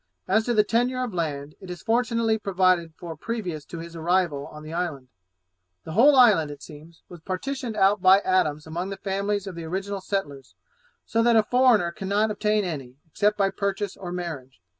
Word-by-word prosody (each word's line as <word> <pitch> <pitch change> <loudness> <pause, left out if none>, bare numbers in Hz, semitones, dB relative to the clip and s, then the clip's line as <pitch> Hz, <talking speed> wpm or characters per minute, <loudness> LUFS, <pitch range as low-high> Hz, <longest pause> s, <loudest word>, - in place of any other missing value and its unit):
As 220 +4 +2
to 240 - 0
the 210 - +5
tenure 245 +4 0
of 240 -5 -4
land, 150 -4 -3
it 190 - -10
is 175 -1 -7
fortunately 230 -1 +1
provided 185 -4 +2
for 165 -2 -8
previous 180 -11 -5
to 170 - -8
his 170 +1 -9
arrival 165 -3 0
on 150 0 -11
the 155 +1 -8
island. 160 -7 -3 0.7
The - - -8
whole 270 - +6
island, 210 - +5
it 145 -1 -10
seems, 160 +2 -13
was 175 - -11
partitioned 230 - -4
out 195 0 +3
by 190 +1 +7
Adams 155 -6 +1
among 170 +4 -4
the 195 - -5
families 200 +1 -2
of 195 - -6
the 170 -1 -7
original 195 +3 -4
settlers, 145 -9 -4 0.5
so 230 - +1
that 235 0 +4
a 220 - +5
foreigner 245 -7 +3
cannot 205 +3 0
obtain 210 0 +1
any, 135 -8 -6 0.2
except 210 +4 +1
by 195 -1 +2
purchase 200 0 -2
or 185 -3 -7
marriage. 155 - -6
190 Hz, 190 wpm, -25 LUFS, 165-210 Hz, 0.7 s, by